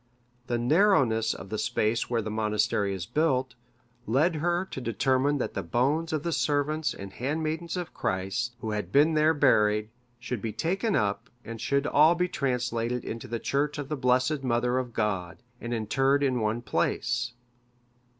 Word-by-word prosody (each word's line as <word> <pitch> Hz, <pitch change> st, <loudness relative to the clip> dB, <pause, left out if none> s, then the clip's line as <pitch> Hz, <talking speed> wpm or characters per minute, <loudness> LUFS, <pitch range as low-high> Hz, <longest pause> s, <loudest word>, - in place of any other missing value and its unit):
The 120 Hz, -, 0 dB
narrowness 125 Hz, -, +3 dB
of 95 Hz, -, -10 dB
the 110 Hz, -, -3 dB
space 110 Hz, +2 st, 0 dB
where 115 Hz, -2 st, 0 dB
the 110 Hz, -, -4 dB
monastery 105 Hz, -2 st, 0 dB
is 95 Hz, -3 st, -4 dB
built, 130 Hz, -, 0 dB, 0.5 s
led 155 Hz, -, +2 dB
her 175 Hz, +3 st, 0 dB
to 135 Hz, -, -7 dB
determine 130 Hz, +4 st, +1 dB
that 130 Hz, -, -3 dB
the 100 Hz, -, -2 dB
bones 135 Hz, -, 0 dB
of 155 Hz, -2 st, -1 dB
the 170 Hz, -, -1 dB
servants 150 Hz, -1 st, 0 dB
and 100 Hz, -1 st, -9 dB
handmaidens 155 Hz, +6 st, -2 dB
of 175 Hz, -1 st, -5 dB
Christ, 95 Hz, +6 st, -2 dB
who 110 Hz, -, -3 dB
had 105 Hz, -4 st, -3 dB
been 150 Hz, +5 st, +4 dB
there 155 Hz, +1 st, +3 dB
buried, 105 Hz, -6 st, +3 dB, 0.3 s
should 120 Hz, -2 st, -5 dB
be 110 Hz, -2 st, -3 dB
taken 190 Hz, -, 0 dB
up, 100 Hz, -1 st, -1 dB, 0.2 s
and 115 Hz, -1 st, -7 dB
should 140 Hz, +3 st, +1 dB
all 155 Hz, +3 st, +5 dB
be 180 Hz, +1 st, +1 dB
translated 125 Hz, -4 st, -1 dB
into 115 Hz, -, -6 dB
the 115 Hz, -, -3 dB
church 140 Hz, +5 st, -1 dB
of 145 Hz, -2 st, -5 dB
the 155 Hz, -, -1 dB
Blessed 130 Hz, +2 st, +1 dB
Mother 125 Hz, 0 st, +1 dB
of 125 Hz, -2 st, -4 dB
God, 95 Hz, -3 st, -2 dB, 0.2 s
and 120 Hz, -, -6 dB
interred 135 Hz, +5 st, +1 dB
in 130 Hz, -3 st, +1 dB
one 110 Hz, +2 st, -1 dB
place. 120 Hz, +1 st, -1 dB
125 Hz, 170 wpm, -27 LUFS, 110-150 Hz, 0.5 s, all